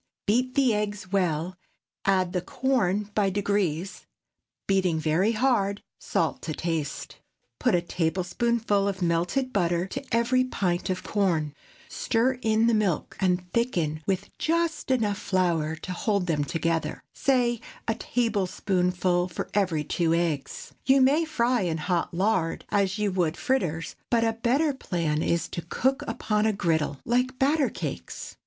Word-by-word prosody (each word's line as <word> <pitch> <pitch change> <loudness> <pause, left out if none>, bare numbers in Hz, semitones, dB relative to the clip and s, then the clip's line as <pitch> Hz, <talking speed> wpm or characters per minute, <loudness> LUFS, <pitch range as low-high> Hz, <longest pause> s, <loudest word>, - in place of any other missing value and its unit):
Beat 255 +4 +1
the 265 -4 +4
eggs 205 -2 -3
well, 180 -2 0 0.5
add 185 -2 +2
the 180 - 0
corn 210 -5 0
by 205 -2 +2
degrees, 190 -3 -1 0.6
beating 185 -4 +2
very 165 +8 +2
hard; 215 -4 +1 0.2
salt - - -1
to 155 - -4
taste; 165 -4 -3 0.4
put - - +3
a 175 - +2
tablespoonful 195 +5 0
of 190 -2 -2
melted 175 +11 0
butter 175 -2 +1
to 270 +8 -5
every 235 +3 +3
pint 185 -7 -1
of 185 -1 -2
corn; 170 -8 0 0.3
stir 250 -2 0
in 220 0 +3
the 235 - +3
milk, 205 -7 0
and 180 -1 +1
thicken 170 -11 0
with 195 0 -2
just 330 -2 0
enough 215 -6 +1
flour 170 -4 0
to 170 - -7
hold 200 0 0
them 155 -4 0
together—say 220 - 0 0.3
a 225 - +2
tablespoonful 185 -6 0
for 170 - -5
every 185 -7 +1
two 165 +2 +1
eggs. 165 -5 -2
You 270 +1 +5
may 290 +6 +4
fry 250 -6 +1
in 170 -3 -1
hot 175 +2 -1
lard, 180 -2 0
as 200 -1 +1
you 210 -1 0
would 175 -3 0
fritters, 175 - -1
but 230 -1 +3
a 225 0 +2
better 265 +7 +1
plan 170 - -1
is 170 +1 0
to 170 - -4
cook 260 +10 0
upon 210 0 0
a 220 - +2
griddle, 160 -6 0
like 250 +2 +1
batter 280 +1 +3
cakes. - - -6
195 Hz, 145 wpm, -26 LUFS, 175-235 Hz, 0.6 s, You